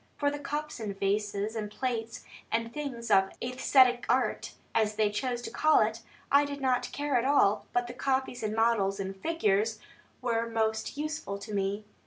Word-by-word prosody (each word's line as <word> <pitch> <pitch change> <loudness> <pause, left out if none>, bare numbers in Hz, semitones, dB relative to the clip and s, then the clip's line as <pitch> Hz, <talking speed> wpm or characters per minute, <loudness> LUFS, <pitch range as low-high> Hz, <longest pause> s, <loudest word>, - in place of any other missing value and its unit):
For 285 -1 +1
the 290 - -5
cups, 295 0 -4
and 200 -3 -5
vases, 205 +2 -1
and 215 -2 -3
plates, 230 -1 -3 0.3
and 230 0 -1
things 245 -6 -5
of 190 -1 +5
"æsthetic 250 0 +3
art" 250 -4 +1 0.2
(as 215 -1 +1
they 210 -1 +2
chose 240 +2 -2
to - - -5
call 310 0 +4
it), 220 +1 0 0.3
I 280 +1 +6
did 285 0 -4
not 250 -2 0
care 290 -2 0
at 235 - +1
all; 240 -7 +3
but 245 0 +1
the 240 - -7
copies 265 -1 -1
and 215 -1 -2
models 220 -4 +2
and 195 0 -4
figures 215 -5 +1 0.4
were 230 -2 -1
most 220 +3 -1
useful 305 -9 -3
to 200 +1 -8
me. 200 +1 -1
230 Hz, 180 wpm, -29 LUFS, 210-265 Hz, 0.4 s, I